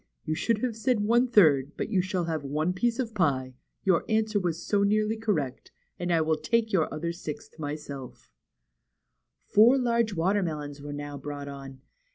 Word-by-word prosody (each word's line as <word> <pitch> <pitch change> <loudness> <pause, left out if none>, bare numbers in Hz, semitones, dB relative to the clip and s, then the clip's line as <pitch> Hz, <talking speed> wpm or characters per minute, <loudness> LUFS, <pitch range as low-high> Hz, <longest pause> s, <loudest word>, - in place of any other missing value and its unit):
You 155 - -1
should 215 +7 0
have 245 -3 -1
said 230 -1 +1
one 235 +4 +3
third, 150 - +4
but - - -3
you 195 -4 +2
shall 185 -1 -2
have 160 -3 -2
one 155 +5 -1
piece 235 +5 0
of 240 -4 -3
pie, 135 -10 0 0.3
your 185 -3 +3
answer 220 -1 +2
was 175 -3 -3
so 205 -1 +2
nearly 215 +2 +2
correct, 195 - -2 0.3
and 175 0 -1
I 165 -1 +3
will 160 0 +1
take 225 +7 0
your 165 -5 +2
other 170 +2 -3
sixth 160 -2 -8
myself." 145 -3 -7 1.1
Four 230 +6 +6
large 235 -4 +1
watermelons 165 -6 -1
were 145 0 -7
now 145 0 -6
brought 145 0 -6
on. 135 -1 -9
175 Hz, 175 wpm, -27 LUFS, 145-220 Hz, 1.1 s, Four